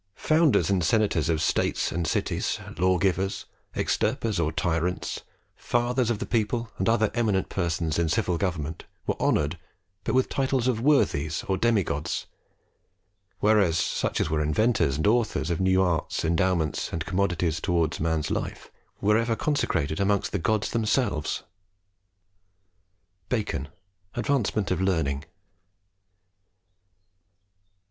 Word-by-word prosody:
"Founders 155 - +3
and 95 -3 +2
senators 90 -4 +2
of 80 -1 +1
states - - +1
and 85 -1 -2
cities, - - -1 0.2
lawgivers, 95 +1 +1 0.3
extirpers 110 -5 0
of 80 -1 0
tyrants, 85 +2 -1 0.3
fathers 120 0 0
of 120 - 0
the - - -4
people, 115 0 -1
and 95 - +1
other 110 -2 +2
eminent 105 -5 +1
persons 85 -3 -1
in 85 -1 +1
civil 85 +1 0
government, 80 -5 -3 0.2
were - - 0
honoured - - +1 0.4
but - - -1
with 130 - +3
titles 130 -2 0
of 115 -3 +1
Worthies 85 - +2
or 95 - +1
demi 110 0 +2
gods; 75 +1 -3 1.2
whereas, 100 -6 +4
such - - -1
as - - +1
were 75 0 0
inventors 75 - +2
and 80 - -1
authors 105 -8 +1
of 85 - -1
new 95 0 +4
arts, 85 -2 -1
endowments, 85 -2 0
and 80 -2 -3
commodities 90 -4 0
towards 85 -4 0
man's 80 -1 0
life, - - -4 0.3
were 105 +2 +4
ever 115 0 0
consecrated 85 - 0
amongst 100 0 +1
the 100 - -1
gods 105 +4 0
themselves." 110 - 0 1.9
BACON, 105 - -1 0.5
Advancement 120 -6 0
of 90 0 0
Learning. 80 -6 0
95 Hz, 125 wpm, -26 LUFS, 80-110 Hz, 1.9 s, whereas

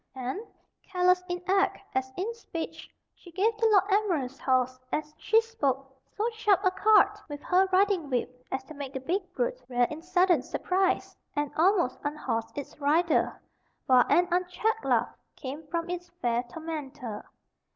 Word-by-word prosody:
and, 260 +7 -3 0.4
careless 365 -1 +2
in 355 0 -2
act 390 +1 +3 0.2
as 260 0 -1
in 410 +6 -2
speech, 345 -8 -7 0.2
she 350 - -16
gave 410 +6 +1
the 450 +1 +3
Lord 405 -4 +5
Admiral's 335 -11 +1
horse, 255 -1 +1
as 305 0 -2
she 440 +8 +3
spoke, 275 - -2 0.2
so 430 +2 +1
sharp 420 -4 +2
a 370 - +5
cut 415 +1 +4
with 290 0 -6
her 375 +1 +3
riding 375 -5 +3
whip 250 0 -2
as 265 0 -2
to 290 - -11
make 280 -2 -7
the 265 - -3
big 360 +7 -2
brute - - -1
rear 245 -1 +3
in 305 +1 -6
sudden 355 -3 +3
surprise, 370 +8 0 0.2
and 290 -1 -1
almost 345 -5 +3
unhorse 290 -6 -2
its 285 0 -7
rider, 315 +4 +2 0.5
while 255 -1 +6
an 355 +1 +4
unchecked 365 +5 0
laugh - - +1 0.2
came 285 +3 -7
from 335 +2 -2
its 355 0 -5
fair 240 0 +1
tormentor. 290 -8 -6
340 Hz, 160 wpm, -28 LUFS, 270-385 Hz, 0.5 s, while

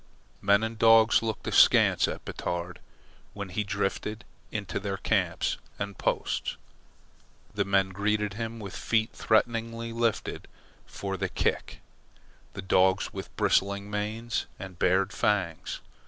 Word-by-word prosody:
Men 100 +2 +4
and 110 0 -4
dogs 115 0 +6
looked 110 -1 -3
askance - - +5
at - - -6
Batard 90 0 -4 0.5
when 100 -2 -6
he 105 +4 -1
drifted 100 +2 -3 0.3
into 105 -6 -3
their 100 -1 -3
camps - - 0 0.2
and 100 -1 -4
posts. - - -1 1.0
The 100 -1 0
men 95 -1 +2
greeted 105 +2 0
him 115 +2 -5
with 100 -3 -7
feet 110 0 0
threateningly 115 +1 0
lifted 115 -1 -1 0.4
for 95 -1 -4
the 95 -1 -2
kick, - - -2 0.7
the 95 - -6
dogs 95 0 +3
with - - -8
bristling 100 +1 +1
manes 110 +2 -2
and 95 -3 -9
bared 95 +2 +2
fangs. 95 -6 -1
100 Hz, 125 wpm, -28 LUFS, 95-110 Hz, 1.0 s, dogs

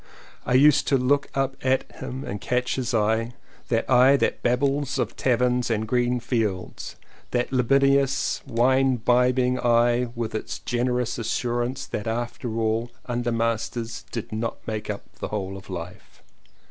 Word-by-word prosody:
I 125 - +2
used 145 +2 +5
to 135 - +4
look 140 +3 +2
up 135 0 0
at 130 0 +2
him 130 +2 -6
and 105 -5 -5
catch 125 0 0
his 125 -3 -2
eye 110 +1 +1 0.2
— - - -28
that 115 -1 +1
eye 130 +2 +6
that - - 0
babbles 135 +3 +1
of - - -2
taverns 125 -1 +1
and 110 -1 -1
green 125 +1 +1
fields, 110 -6 -3 0.3
that 125 +1 -1
libidinous 135 +2 +2
and 115 -4 -7
wine 130 +2 +4
bibbing 125 +1 +2
eye 120 0 +3
with 115 -2 -3
its 110 - -4
generous 125 0 -1
as 115 - -3
surance 120 +2 -1
that 105 - -4
after 120 0 -3
all 115 +1 0 0.2
undermasters 115 -1 -2
did 115 - -5
not 110 +2 -4
make 110 -1 -4
up 100 -1 -4 0.2
the - - -3
whole 95 -2 -4
of 95 - -11
life. - - -8
120 Hz, 160 wpm, -25 LUFS, 115-130 Hz, 0.3 s, eye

